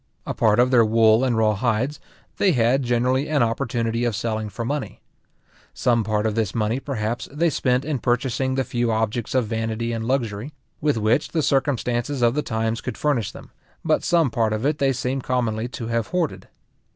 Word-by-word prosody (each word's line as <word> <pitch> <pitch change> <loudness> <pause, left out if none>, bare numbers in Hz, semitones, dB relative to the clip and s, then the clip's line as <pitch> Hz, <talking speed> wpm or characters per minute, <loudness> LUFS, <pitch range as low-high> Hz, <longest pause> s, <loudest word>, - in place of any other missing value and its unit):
A - - -3
part 110 0 +3
of 125 +1 +4
their 120 -3 +6
wool 110 +1 +4
and 125 -3 +1
raw 110 -1 +3
hides, 120 +6 -1 0.4
they 190 -3 +3
had 125 +2 +3
generally 125 +3 +1
an 145 -5 +3
opportunity 115 -1 -1
of 120 -3 0
selling 110 -1 -2
for 115 +4 -5
money. 145 +2 -3 0.8
Some 115 -2 +2
part 105 0 -1
of 110 - +1
this 110 -3 -1
money, 110 +2 0
perhaps, 120 -4 -3
they 160 +3 +1
spent 125 0 +1
in 150 -4 -1
purchasing 130 +2 0
the 135 - +1
few 120 -2 -1
objects 110 +2 -1
of 130 -3 +3
vanity 115 +1 -2
and 115 -1 -3
luxury, 120 0 -2 0.3
with 145 -5 +1
which 110 +6 +2
the 160 -2 -1
circumstances 130 -1 0
of 120 0 +4
the 150 - 0
times 110 -2 -2
could 125 - -5
furnish 120 -8 0
them; 135 -1 -13 0.3
but 155 -1 +2
some 165 -7 +2
part 110 -2 +1
of 110 +4 -2
it 150 +1 +1
they 135 -1 +3
seem 130 +1 -2
commonly 120 -3 -1
to 125 -1 -7
have 115 -1 -1
hoarded. 175 -4 -2
120 Hz, 195 wpm, -23 LUFS, 110-135 Hz, 0.8 s, their